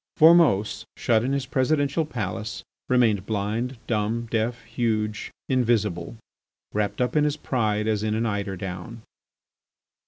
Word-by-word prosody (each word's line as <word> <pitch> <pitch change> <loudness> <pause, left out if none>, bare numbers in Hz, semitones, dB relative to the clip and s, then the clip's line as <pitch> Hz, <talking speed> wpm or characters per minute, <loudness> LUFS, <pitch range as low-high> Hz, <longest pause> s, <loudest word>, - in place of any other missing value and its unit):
Formose, 160 - +5
shut 110 -1 +2
in 130 - 0
his 140 -1 0
presidential 145 +3 +1
palace, 110 -2 -4 0.3
remained 115 -6 +3
blind, 110 +5 -2
dumb, 115 +1 -1
deaf, 115 +1 -1
huge, 110 -2 -1 0.2
invisible, 110 -7 0 0.6
wrapped 105 -1 -1
up 125 +3 0
in 150 - +4
his 150 0 0
pride 110 -7 0
as 105 -2 +1
in 110 0 0
an 115 +1 0
eider 100 -3 -2
down. 95 +5 -7
115 Hz, 130 wpm, -25 LUFS, 105-125 Hz, 0.6 s, Formose